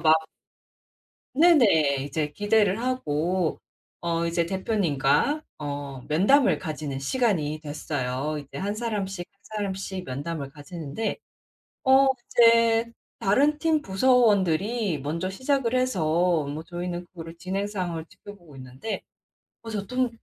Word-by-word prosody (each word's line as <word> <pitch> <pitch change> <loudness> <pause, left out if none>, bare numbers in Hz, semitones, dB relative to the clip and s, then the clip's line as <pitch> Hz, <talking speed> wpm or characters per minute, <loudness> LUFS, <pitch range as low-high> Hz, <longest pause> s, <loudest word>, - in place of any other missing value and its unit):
막 155 -1 +5 1.2
네네. 205 - +5
이제 150 +1 -2
기대를 205 0 +2
하고 180 - -1 0.4
어 170 0 0
이제 170 0 +1
대표님과 190 - +1 0.2
어 145 -3 -5
면담을 205 - +4
가지는 150 -4 -4
시간이 155 - 0
됐어요. 145 -1 -3
이제 145 -2 -9
1 200 +2 -2
사람씩 200 -5 -3
1 200 - -41
사람씩 195 -3 -4
면담을 140 +2 -5
가지는데 150 +7 -5 0.7
어 265 +1 +6 0.2
이제 230 0 +4 0.3
다른 285 +10 +3
팀 315 -2 +2
부서원들이 205 - +2
먼저 165 +6 -2
시작을 260 +4 0
해서 175 - +1
뭐 150 +3 -5
저희는 175 +1 -5
그거를 165 -2 -10
진행 195 +3 -2
상황을 175 -5 -4
지켜보고 175 -9 -14
있는데 130 - -6 0.6
어 230 - -9
저 205 -3 -3
좀 250 +1 0
185 Hz, 250 characters per minute, -26 LUFS, 155-225 Hz, 1.2 s, 어